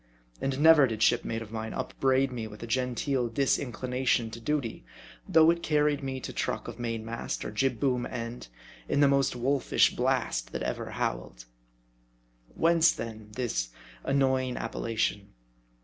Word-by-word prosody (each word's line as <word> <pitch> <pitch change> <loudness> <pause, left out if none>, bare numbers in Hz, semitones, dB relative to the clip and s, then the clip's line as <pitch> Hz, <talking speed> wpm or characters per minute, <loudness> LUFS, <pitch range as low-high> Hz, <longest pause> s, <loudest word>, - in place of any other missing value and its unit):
And 135 0 -1
never 155 -3 +7
did 110 -2 -1
shipmate 115 0 +1
of 105 - -13
mine 110 0 -4
upbraid 135 0 +1
me 115 -3 -4
with 105 +1 -10
a - - -3
genteel 125 +1 0
disinclination 125 -1 0
to 115 - -7
duty, 120 - -2 0.5
though 160 0 +6
it 170 0 -2
carried 150 -2 +2
me 135 -1 -3
to - - -6
truck - - -2
of - - -8
main 115 -2 -3
mast, 115 +1 -4
or - - -4
jib 125 +2 0
boom 125 -3 +1
end, 115 - -6 0.4
in - - +1
the 140 - +7
most 140 -2 +2
wolfish 130 +2 +2
blast - - 0
that - - -3
ever - - -3
howled. - - -4 1.1
Whence 165 0 +4
then, 110 -2 -7
this 110 - -2 0.3
annoying 130 -2 +1
appellation 110 -3 -2
125 Hz, 150 wpm, -29 LUFS, 115-135 Hz, 1.1 s, never